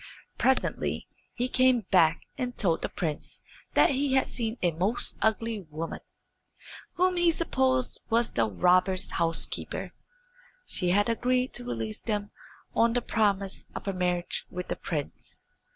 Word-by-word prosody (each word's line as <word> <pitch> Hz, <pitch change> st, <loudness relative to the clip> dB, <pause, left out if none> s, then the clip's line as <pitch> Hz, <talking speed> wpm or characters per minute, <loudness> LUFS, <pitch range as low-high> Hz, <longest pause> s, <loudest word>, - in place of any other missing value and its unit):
Presently 265 Hz, 0 st, +1 dB, 0.3 s
he 245 Hz, 0 st, -2 dB
came 255 Hz, -1 st, +3 dB
back 165 Hz, -4 st, +4 dB
and 250 Hz, -3 st, -4 dB
told 170 Hz, -5 st, +2 dB
the -, -, -2 dB
prince 155 Hz, -4 st, -4 dB, 0.3 s
that -, -, +6 dB
he 275 Hz, 0 st, 0 dB
had 265 Hz, -, +3 dB
seen 230 Hz, -1 st, -3 dB
a 175 Hz, -, +3 dB
most 185 Hz, +9 st, +2 dB
ugly 220 Hz, 0 st, 0 dB
woman, 160 Hz, +2 st, -5 dB, 0.9 s
whom 365 Hz, 0 st, +2 dB
he 345 Hz, -1 st, +4 dB
supposed 260 Hz, -6 st, +1 dB
was 230 Hz, 0 st, +2 dB
the 115 Hz, -2 st, +1 dB
robbers' 185 Hz, -, +3 dB
housekeeper. 165 Hz, -1 st, -1 dB, 0.7 s
She 180 Hz, -, -1 dB
had 205 Hz, +3 st, +3 dB
agreed 250 Hz, +2 st, +1 dB
to 120 Hz, -, -6 dB
release 115 Hz, -3 st, -4 dB
them 205 Hz, -2 st, -2 dB, 0.4 s
on 230 Hz, 0 st, +3 dB
the 245 Hz, -, +1 dB
promise 200 Hz, -3 st, 0 dB
of -, -, -6 dB
her 195 Hz, -, -1 dB
marriage 180 Hz, -1 st, -1 dB
with 180 Hz, 0 st, -6 dB
the -, -, -1 dB
prince. 150 Hz, -4 st, -6 dB
205 Hz, 145 wpm, -28 LUFS, 175-250 Hz, 0.9 s, that